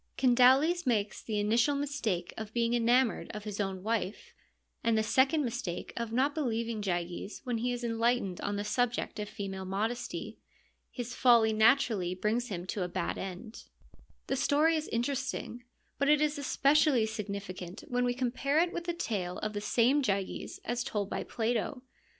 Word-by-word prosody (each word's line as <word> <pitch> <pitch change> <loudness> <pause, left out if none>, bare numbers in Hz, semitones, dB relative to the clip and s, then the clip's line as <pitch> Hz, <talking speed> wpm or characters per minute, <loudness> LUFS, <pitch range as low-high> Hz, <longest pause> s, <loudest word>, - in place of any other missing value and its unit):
Candaules 265 +6 +4
makes 210 -4 0
the 215 -2 -2
initial 230 +7 +2
mistake 255 -11 -2
of 220 -1 -7
being 235 0 +1
enamoured 240 +1 +2
of 210 - -6
his 210 -1 -6
own 190 -2 -2
wife, 220 -2 -2 0.5
and 230 -1 +3
the 220 - +2
second 265 +6 +3
mistake 235 -7 -4
of 235 -1 -3
not 265 +5 +2
believing 230 -6 -2
Gyges 175 +1 -3
when 245 -3 -2
he 245 +2 0
is 245 0 -4
enlightened 230 -4 0
on 205 - -2
the 205 - -2
subject 240 +1 -1
of 210 0 -4
female 195 -1 -5
modesty. 220 +6 -3 0.5
His 245 0 -6
folly 230 -3 +5
naturally 220 -5 +3
brings 220 +6 0
him 180 -5 -5
to 190 +1 -3
a - - -2
bad 175 - -3
end. 195 +4 -7 0.6
The 270 - -1
story 295 +4 +3
is 310 0 -2
interesting, 245 0 -3 0.3
but 280 +1 +2
it 300 -1 +6
is 300 -1 +1
especially 280 -3 +3
signi 210 -2 -4
ficant 185 -2 -8
when 245 0 0
we 245 0 +1
compare 260 +3 0
it 345 +2 +3
with 340 - -4
the 345 - -1
tale 200 - -3
of 215 0 -3
the 205 - -3
same 240 +7 +3
Gyges 195 -6 -2
as 240 +1 -1
told 205 -6 -3
by - - -2
Plato. 240 +2 -2
230 Hz, 175 wpm, -31 LUFS, 205-260 Hz, 0.6 s, it